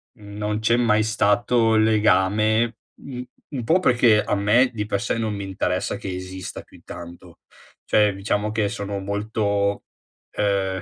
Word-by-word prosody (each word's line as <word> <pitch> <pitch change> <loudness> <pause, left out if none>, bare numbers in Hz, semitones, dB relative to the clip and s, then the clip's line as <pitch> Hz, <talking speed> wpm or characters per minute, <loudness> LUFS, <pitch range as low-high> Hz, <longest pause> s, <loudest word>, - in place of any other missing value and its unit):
non 105 -1 -4
c'è 115 +2 +2
mai 110 -3 +3
stato 110 +2 +2
il 110 - +4
legame 110 +1 +2 0.2
un 125 -2 -7 0.3
un 130 -3 -3
po' 165 +9 +4
perché 120 -8 +4
a - - -2
me 105 +6 +3
di 105 -2 -3
per 100 - -1
sé, 115 +1 -2
non 110 -2 -2
mi 100 - -5
interessa 95 -1 -2
che 95 - -6
esista 95 0 -7
più - - -18
di - - -22
tanto, 85 0 -11 0.5
cioè 105 -1 +3
diciamo 105 +2 -1
che 110 -2 0
sono 100 -2 -4
molto, 100 0 -1 0.5
ehm, 95 -2 -1
105 Hz, 160 wpm, -23 LUFS, 100-110 Hz, 0.5 s, il